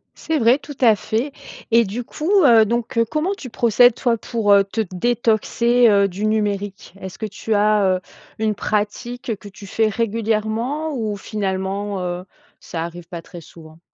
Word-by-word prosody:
C'est 320 -1 -2
vrai. 235 +2 +5
Tout 290 0 -10
à 225 -4 +6
fait 230 +8 -2 0.4
et 230 0 +6
du 220 +6 -4
coup, 310 +9 -4
heu, 230 -5 +7
donc, 235 +1 -2
heu, 230 - +4
comment 310 - -1
tu 255 - -8
procèdes, 240 +1 +4
toi, 240 -2 +1
pour, 220 -1 -1
heu, 200 0 +7
te 200 +3 -3
détoxer, 235 +3 +2
heu, 200 -1 +4
du 195 +3 -4
numérique? 205 -3 -2
Est-ce 190 -1 -9
que 220 - -3
tu 215 +2 -3
as, 210 0 +3
heu, - - -11 0.4
une 215 -1 0
pratique 220 +4 -3
que 205 - -11
tu 200 0 -12
fais 220 +3 +1
régulièrement 225 +7 -1
ou 215 -3 -2
finalement, 195 -1 -3
heu, 180 0 -4 0.4
ça 165 -2 -5
arrive 170 0 -8
pas 170 -1 -7
très 175 - -11
souvent? 160 0 -15
215 Hz, 175 wpm, -20 LUFS, 200-235 Hz, 0.4 s, heu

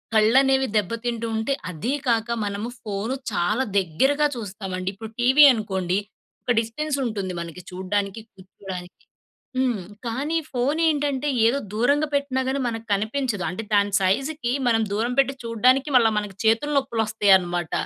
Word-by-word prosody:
కళ్ళనేవి 265 +5 +4
దెబ్బతింటూ 230 +3 -2
ఉంటే, 220 +5 0 0.2
అది 190 - -3
కాక 230 -1 +2 0.2
మనము 205 +3 -3
ఫోను 215 +4 -3 0.2
చాలా 210 +7 +1
దగ్గరగా 265 - +2
చూస్తామండి. 190 -4 -5
ఇప్పుడు 220 +3 -9
టీవీ 260 +5 +6
అనుకోండి 190 -5 -1 0.5
ఒక - - 0
డిస్టెన్సుంటుంది 230 -5 -2
మనకి 170 +1 -8
చూడ్డానికి. 195 +3 -2
కూర్చోడానికి. 185 -1 -9 0.6
హ్మ్. 250 -6 0 0.2
కానీ 275 +8 -2 0.2
ఫోనేంటంటే 290 +1 +1 0.2
ఏదో 245 +5 +2 0.2
దూరంగా 285 +7 +2
పెట్టినా 280 -2 0
గానీ 275 +1 -1
మనకు 225 -1 -5
కనిపించదు. 215 -1 -2
అంటే 185 +5 -5
దాని 205 0 +3
సైజుకి 245 +7 0 0.2
మనం 225 -1 +3
దూరం 225 +4 0
పెట్టి 275 0 0
చూడడానికి 250 +5 +2
మళ్ళా 230 -3 +5
మన 210 -1 -3
చేతులు 225 +7 +2
నొప్పులొస్తయనమాట. 205 -8 +1
225 Hz, 130 wpm, -23 LUFS, 200-265 Hz, 0.6 s, టీవీ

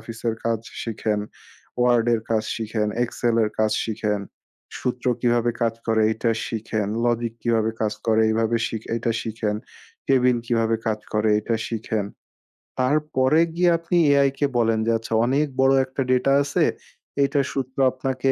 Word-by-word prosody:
অফিসের 115 +1 -4
কাজ 115 -1 0 0.2
শিখেন। 110 -2 -2 0.6
ওয়ার্ড 120 -1 +3
এর 115 - -1
কাজ 110 -1 +1
শিখেন, 110 -1 -2 0.2
এক্সেল 120 0 -1
এর 105 - -2
কাজ 110 -1 +2
শিখেন, 105 -2 -1 0.6
সূত্র 125 0 -3
কিভাবে 120 -1 +2
কাজ 115 -1 +1
করে 110 -1 +2
এটা 115 +1 0 0.2
শিখেন, 110 -2 -3 0.2
লজিক 120 -1 0
কিভাবে 115 -2 +1
কাজ 105 -1 +1
করে, 110 0 +3
এইভাবে 115 +1 +1
শিখে 110 -1 -6
এইটা 115 0 0
শিখেন। 110 -2 -2 0.5
কেবিন 125 -2 +3
কিভাবে 115 -1 +1
কাজ 110 -1 0
করে 105 0 +2
এটা 115 +2 -1
শিখেন। 110 -2 -2 0.8
তারপরে 145 +1 +2 0.2
গিয়ে 175 0 +3
আপনি 170 +1 -1 0.2
এআই 140 -1 +4
কে 145 - +2
বলেন 115 -1 +2
যে 115 - +2
আচ্ছা 115 0 -7
অনেক 140 +5 +1
বড় 135 0 +5
একটা 130 +1 -4
ডেটা 130 +2 +3
আছে। 145 - +1 0.6
এটা 140 +1 +1
সূত্র 130 -1 -4
আপনাকে 130 +1 -1
115 Hz, 155 wpm, -23 LUFS, 110-130 Hz, 0.8 s, বড়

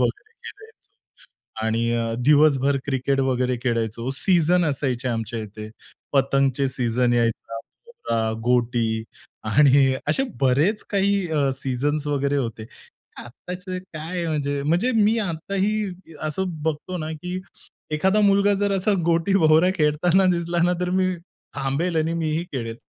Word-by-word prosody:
वगैरे 425 +2 -2
खेळायचो 440 -1 -13 0.9
आणि 115 +1 0
अ, 115 -1 -1
दिवसभर 140 -2 +4
क्रिकेट 135 0 0
वगैरे 125 -1 0
खेळायचो. 115 0 -2
सीझन 175 +1 +2
असायचे 130 -3 -1
आमच्या 115 0 -3
इथे. 105 0 -8 0.4
पतंगचे 135 0 +2
सीझन 125 -1 0
यायचा. 115 -1 -1 0.3
भवरा, 115 - -2
गोटी 120 -2 +1 0.4
आणि 135 +3 +4
असे 270 - +3 0.2
बरेच 145 - +2
काही 200 0 +2
अ, 145 -3 +1
सीझन्स 140 +3 -2
वगैरे 140 0 0
होते. 115 -4 -3 0.5
आत्ताच 180 +9 -9
काय 180 -1 -5
म्हणजे, 145 -2 -1
म्हणजे 175 - +1
मी 220 +1 +3
आत्ताही 195 +2 -1 0.3
असं 155 +5 -2 0.2
बघतो 160 +4 -3
ना, 155 0 -4
की 180 +4 -5 0.5
एखादा 190 +7 +2
मुलगा 200 0 +4
जर 200 0 0
असा 200 +3 +1
गोटी, 170 +3 +1
भवरा 160 +2 +5
खेळताना 165 +5 +3
दिसला 170 0 -2
ना, 180 - +2
तर 180 0 -1
मी 185 0 +1 0.4
थांबेल 155 +6 -1
आणि 160 +1 +1
मी 160 -2 -1
ही 170 - -3
खेळेल. 115 -3 -4
150 Hz, 135 wpm, -23 LUFS, 125-180 Hz, 0.9 s, भवरा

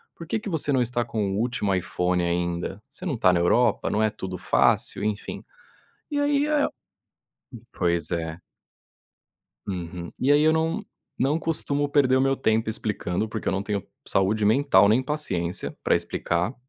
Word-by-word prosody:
Por 165 - -10
que 220 - -1
que 215 - -9
você 160 -4 0
não 130 -2 +3
tá 120 0 -1
com 105 -4 -2
o 100 - -2
último 110 -4 0
iPhone 90 0 0
ainda? 85 +3 -2
Você 160 - -12
não 145 -10 -1
tá 90 -4 +4
na 85 - +2
Europa, 115 +6 +2
não 110 +1 +1
é 110 - +2
tudo 95 -3 -6
fácil?", 100 - +2
enfim. 105 -1 -3 0.7
E 290 - -1
aí 290 0 +2
é 300 -1 +2 1.1
pois 85 -3 0
é. 80 -1 -3 1.3
Uhum. 90 -2 -5
E 140 +3 +4
aí 145 +1 +5
eu 155 - +5
não 165 +6 0 0.3
não 145 +5 +2
costumo 145 -3 0
perder 140 -3 +3
o - - +3
meu 135 0 +3
tempo 110 -4 +1
explicando, 105 -2 -2
porque 110 0 -6
eu - - +2
não 95 +1 -1
tenho 100 -2 -3 0.2
saúde 100 +3 +2
mental 120 -2 +5
nem 115 +5 +4
paciência 130 - -3
pra - - +3
explicar. 90 +8 -1
110 Hz, 175 wpm, -25 LUFS, 90-145 Hz, 1.3 s, aí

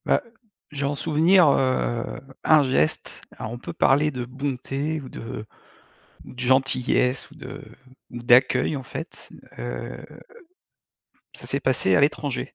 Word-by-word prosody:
Bah, - - +3 0.5
j'ai 140 -1 -3
en 145 +1 -1
souvenir, 165 +4 +4
heu, 130 -3 +1 0.4
un 155 -2 +6
geste, 130 - 0 0.2
alors 110 - -6
on 120 - -5
peut - - -7
parler 145 +3 +3
de 125 -3 -4
bonté 135 +3 -3
ou 130 - -10
de 115 -2 -7 0.8
ou - - -12
de 125 - -13
gentillesse 130 0 +1
ou - - -15
de 135 +3 -9 0.5
ou 120 - -7
d'accueil, 125 +4 +4
en 135 - -7
fait, 160 +6 -7 0.3
heu, - - -6 1.3
ça - - -10
s'est 140 - -1
passé 125 -8 +4
à - - +5
l'étranger. 145 -2 -1
135 Hz, 145 wpm, -24 LUFS, 125-145 Hz, 1.3 s, un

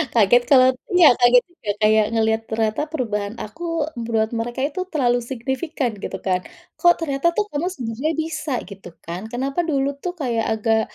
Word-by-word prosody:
kaget 235 +2 +5
kalo 260 -1 +6 0.2
iya, 350 -4 +8
kaget 245 0 +6
juga 285 -11 -10
kayak 215 0 +5
ngelihat 220 0 +2
ternyata 220 +6 -1
perubahan 220 -9 -3
aku 330 +9 -4 0.2
buat 225 -1 0
mereka 240 +2 -3
itu 335 +6 -2
terlalu 250 -8 +1
signifikan 265 +2 -3
gitu - - -5
kan, 185 -1 +1 0.4
"Kok, 345 -1 +6
ternyata 315 +3 0
kamu 360 -6 -1
tuh - - -2
sebenarnya 245 +4 -2
bisa," 310 -1 -3
gitu 195 -3 -12
kan, 175 +6 -6
"kenapa 265 +6 -3
dulu 280 -3 +1
tuh 355 +4 -4
kayak 240 -8 -1
agak 220 0 +2
245 Hz, 165 wpm, -21 LUFS, 220-305 Hz, 0.4 s, iya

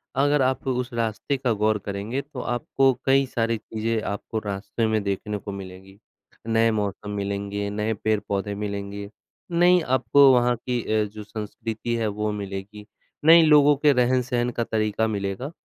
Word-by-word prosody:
अगर 145 +2 +3
आप 130 0 0
उस 125 0 -1
रास्ते 115 +3 -1
का 130 -2 0
गौर 110 +1 +1
करेंगे, 105 +7 -3
तो 140 -2 -10
आपको 130 +2 +1
कई 135 0 +4
सारी 115 -2 -1
चीज़ें 110 +1 -3
आपको 105 +2 -4
रास्ते 105 +2 -3
में 110 -1 +1
देखने 100 +1 -2
को 100 0 -7
मिलेंगी। 95 0 -10 0.5
नए 115 0 +3
मौसम 105 -1 -3
मिलेंगे, 100 0 -3
नए 105 +2 -1
पेड़-पौधे 105 -1 -2
मिलेंगे, 100 0 -5 0.4
नई 175 +1 +5
आपको 135 0 +4
वहाँ 125 0 +3
की 125 +1 -2 0.2
अ, - - +2
जो 105 +1 -9
संस्कृति 110 +2 -5
है 115 -1 0
वो 105 +1 -2
मिलेगी, 100 +1 -6 0.4
नए 165 +1 +9
लोगों 150 -2 +6
के 145 +1 +4
रहन-सहन 125 -1 +1
का 120 -1 -2
तरीका 110 0 0
मिलेगा। 100 +6 -3
110 Hz, 155 wpm, -24 LUFS, 100-125 Hz, 0.5 s, नए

